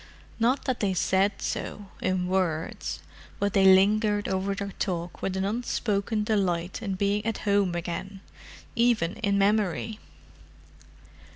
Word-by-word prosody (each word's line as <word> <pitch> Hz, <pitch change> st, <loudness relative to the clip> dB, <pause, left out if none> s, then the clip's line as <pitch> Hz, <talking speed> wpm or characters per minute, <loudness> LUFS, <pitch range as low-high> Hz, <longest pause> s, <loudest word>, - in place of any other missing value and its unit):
Not 245 Hz, +4 st, +2 dB
that 260 Hz, -3 st, -1 dB
they 195 Hz, -3 st, 0 dB
said 195 Hz, +3 st, +1 dB
so, 205 Hz, -2 st, -4 dB
in 185 Hz, -1 st, 0 dB
words. 180 Hz, -4 st, -1 dB, 0.4 s
But 200 Hz, -1 st, 0 dB
they 195 Hz, -1 st, +4 dB
lingered 205 Hz, +2 st, +3 dB
over 190 Hz, +1 st, -1 dB
their 200 Hz, 0 st, -4 dB
talk 175 Hz, -3 st, -3 dB
with 190 Hz, 0 st, -2 dB
an 190 Hz, -, 0 dB
unspoken 210 Hz, -1 st, -1 dB
delight 190 Hz, -4 st, 0 dB
in 200 Hz, -4 st, -2 dB
being 200 Hz, +2 st, 0 dB
at 225 Hz, -1 st, -1 dB
home 200 Hz, -3 st, +2 dB
again—even 190 Hz, +3 st, -2 dB
in 200 Hz, -2 st, +1 dB
memory. 210 Hz, +1 st, +1 dB
200 Hz, 125 wpm, -27 LUFS, 185-210 Hz, 0.4 s, they